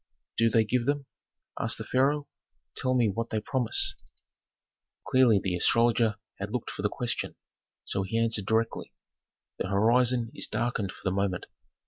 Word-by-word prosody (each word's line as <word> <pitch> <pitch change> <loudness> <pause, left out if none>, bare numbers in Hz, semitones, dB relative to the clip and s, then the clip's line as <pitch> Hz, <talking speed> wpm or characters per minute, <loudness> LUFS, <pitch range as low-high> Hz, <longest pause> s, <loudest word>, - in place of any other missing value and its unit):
"Do 115 0 +3
they 115 0 +4
give 120 +2 0
them?" 145 -1 0 0.5
asked - - -1
the - - -5
pharaoh. 140 +3 +1 0.5
"Tell 130 0 0
what 115 -1 +1
they 110 - -1
promise 120 +2 0
me." - - -35 1.0
Clearly 125 -5 +5
the 95 -2 -1
astrologer 115 +3 +3 0.2
had 100 +1 -3
looked 120 +1 -3
for - - -6
the 105 - +1
question, 120 +2 -2 0.5
so 100 - -1
he 95 +4 -2
answered 115 -3 +1
directly, 115 0 0 0.7
"The - - -1
horizon 115 +3 +3
is - - 0
darkened 115 -5 -1
for - - -15
the 95 - +1
moment. 95 -1 -1
115 Hz, 155 wpm, -28 LUFS, 105-125 Hz, 1.0 s, Clearly